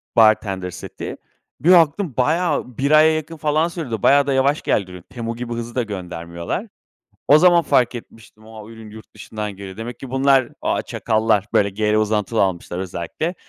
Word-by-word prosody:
bartender 100 -5 +3
seti. - - -8 0.4
Bir 170 - +4
baktım, 170 -1 +4
bayağı 150 -3 0
1 140 +2 0
aya 155 +1 +6
yakın, 155 +1 -5
falan, 155 +2 +1
sürdü. 145 - -5
Bayağı 140 0 +5
da 140 - +1
yavaş 135 +3 +2
geldi. 90 -3 -2
Temu 115 -1 -5
gibi 120 0 -5
hızlı 120 0 -6
da 125 - +1
göndermiyorlar. 85 - -6 0.6
O 150 - +8
zaman 175 0 +5
fark 125 -5 +2
etmiştim; 110 -2 -12
a, 110 -1 -11
ürün 110 -1 -12
yurt 110 +1 -14
dışından 105 -2 -6
geliyor. 95 -1 -9
Demek 115 +2 -7
ki 135 - -8
bunlar, 135 -1 +3
ah - - 0
çakallar, 110 -2 0
böyle, 100 0 +2
gr 105 +2 0
uzantılı 110 0 +1
almışlar 90 -2 -2
özellikle. 95 - -4
115 Hz, 170 wpm, -20 LUFS, 105-145 Hz, 0.6 s, O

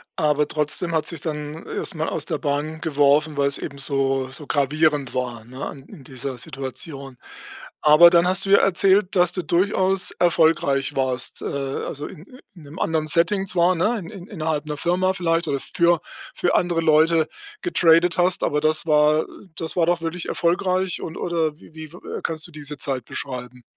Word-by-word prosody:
aber 150 -3 +1
trotzdem 155 +3 -2
hat's 160 -1 0
dich 165 -4 -7
dann 150 0 -5
erstmal 160 -3 -3
aus 155 - -4
der - - -3
Bahn 150 +2 -2
geworfen, 145 0 +2
weil's 140 0 +1
eben 140 - -7
so 135 -1 0
so 145 +2 -10
gravierend 145 0 +1
war, 120 -3 -3
ne, 130 +3 -9
an 135 - -8
in 140 - -13
dieser 130 0 -6
Situation. 135 +1 -7 0.7
Aber 155 +3 +8
dann 170 0 +4
hast 190 +2 +4
du 195 - -2
ja 200 - +7
erzählt, 195 +1 +3
dass 175 -1 +4
du 180 - -2
durchaus 190 +3 +1
erfolgreich 160 -5 +2
warst, 130 -2 -2
äh, - - -6
also, 140 +1 -4
in 165 -2 -12 0.3
in 170 - -14
'nem 145 +3 -11
anderen 160 -1 0
Setting 190 +5 +3
zwar 180 -1 +3
ne, 210 +8 +1
in 190 0 -10
innerhalb 155 -7 -3
'ner 150 -1 -4
Firma 180 +4 +1
vielleicht 170 -2 0
oder 140 - -1
für 170 +4 +1 0.4
für 175 - 0
andere 175 -2 +1
Leute 160 0 +3 0.4
getradet 170 - +3
hast, 180 +1 +2
aber 150 0 0
das 155 +1 +2
war 150 0 +3 0.3
das 165 -1 -4
war 170 -2 +2
doch 175 -1 +1
wirklich 165 +1 -4
erfolgreich 185 +1 0
und 160 - -6
oder 160 -3 -1
w - - -17
wie, 160 0 -8
äh, 165 +4 -8
kannst 160 -1 -4
du - - -17
diese 150 -1 -8
Zeit 130 -3 -2
beschreiben? 125 -2 -5
155 Hz, 180 wpm, -22 LUFS, 140-175 Hz, 0.7 s, Aber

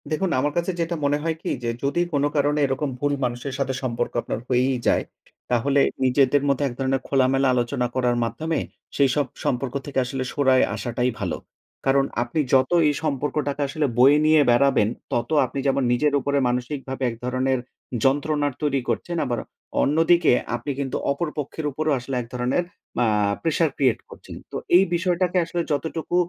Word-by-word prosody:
দেখুন, 170 +4 0
আমার 145 +2 0
কাছে 175 +2 0
যেটা 170 +1 -1
মনে 145 +1 +2
হয় 165 0 0
কি - - -4
যে, 120 - -1
যদি 140 +5 +1
কোন 145 -1 +1
কারণে 145 +1 +2
এরকম 135 +2 -1
ভুল 145 +1 0
মানুষের 120 +3 -4
সাথে 135 -1 0
সম্পর্ক 120 -1 -2
আপনার - - -4
হয়েই 130 +1 +2
যায়, - - +3 0.5
তাহলে 135 +4 +3 0.2
নিজেদের 135 +2 +3
মধ্যে 140 0 +1
এক 125 - -5
ধরনের 135 0 0
খোলামেলা 135 0 +2
আলোচনা 125 +1 0
করার 125 -2 +1
মাধ্যমে 155 +9 -2 0.4
সেই 140 -1 +4
সব 145 -1 +2 0.2
সম্পর্ক 125 0 -1
থেকে 140 -2 -1
আসলে 130 +1 -3
সরে 130 -3 +4
আসাটাই 125 +1 -1
ভালো। - - -2 0.5
কারণ 135 0 +3 0.2
আপনি 160 +6 -3
যত 130 +3 +4 0.2
এই 145 - +2
সম্পর্কটাকা 145 0 -1
আসলে 150 +2 -1
বয়ে 140 +4 +7
নিয়ে 155 0 +5
বেড়াবেন। 125 -3 +4 0.2
তত 120 - -1 0.2
আপনি 135 - -5
যেমন 135 0 +2
নিজের 145 +4 +2
উপরে 140 +1 -1
মানসিকভাবে 130 +2 -3
এক 115 - -6
ধরনের 130 +1 0 0.4
যন্ত্রণার 145 +1 +1
তৈরি 140 -3 +1
করছেন। 170 -1 -2
আবার 120 -3 -1 0.4
অন্যদিকে 165 +4 +4 0.2
আপনি 120 +4 -4
কিন্তু 135 -2 -2
অপর 155 +5 -1
পক্ষের 150 +2 -4
উপরেও 155 +2 0
আসলে 130 +2 -5
এক 115 - -9
ধরনের 125 +7 0 0.4
আ - - +3 0.4
প্রেশার 165 0 +2
ক্রিয়েট 130 -5 +2
করছেন। - - -11 0.2
তো - - -7 0.2
এই 190 - +6
বিষয়টাকে 180 +1 +1
আসলে 170 +1 -2
যতটুকু 160 +4 -2
140 Hz, 170 wpm, -23 LUFS, 130-150 Hz, 0.5 s, বয়ে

